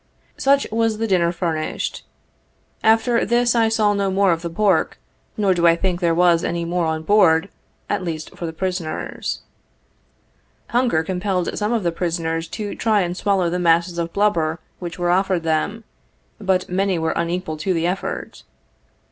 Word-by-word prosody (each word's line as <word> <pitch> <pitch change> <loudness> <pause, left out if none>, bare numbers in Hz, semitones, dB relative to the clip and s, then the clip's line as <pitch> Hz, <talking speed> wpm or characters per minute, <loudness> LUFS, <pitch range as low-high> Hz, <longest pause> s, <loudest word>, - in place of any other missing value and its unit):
Such 275 +1 +3
was 225 -1 +1
the 225 - -1
dinner 180 -5 +2
furnished 165 -3 -2
us. - - -13 0.8
After 225 +2 +3
this 240 +2 +2
I 230 -2 +3
saw 215 -2 +2
no 200 -1 0
more 195 0 +3
of 165 -1 0
the 170 - -4
pork, 190 0 +1 0.4
nor 200 -3 +3
do 175 -1 +3
I 165 - +6
think 180 0 -1
there 170 -2 +1
was 175 -1 +4
any 170 0 -2
more 170 0 0
on 160 0 -2
board, 185 -2 +4 0.4
at 205 -2 -1
least 160 -3 -5
for 170 - -5
the - - -4
prisoners. 180 -1 -4 1.3
Hunger 240 -10 +2
compelled 180 +1 -2
some 210 +1 -1
of 230 -4 0
the 170 - +1
prisoners 165 -1 -2
to 205 +3 -5
try 215 -3 +2
and 175 -1 -2
swallow 190 -3 +1
the 180 - -1
masses 170 0 +2
of 170 0 -2
blubber 170 -6 +1 0.2
which 175 -2 -6
were 175 -1 +1
offered 185 -1 +1
them, 165 +8 -1 0.6
but 190 -3 0
many 190 0 0
were 160 0 0
unequal 170 -2 -2
to 185 +5 -2
the 165 -2 0
effort. 180 +2 -3
180 Hz, 175 wpm, -21 LUFS, 170-205 Hz, 1.3 s, I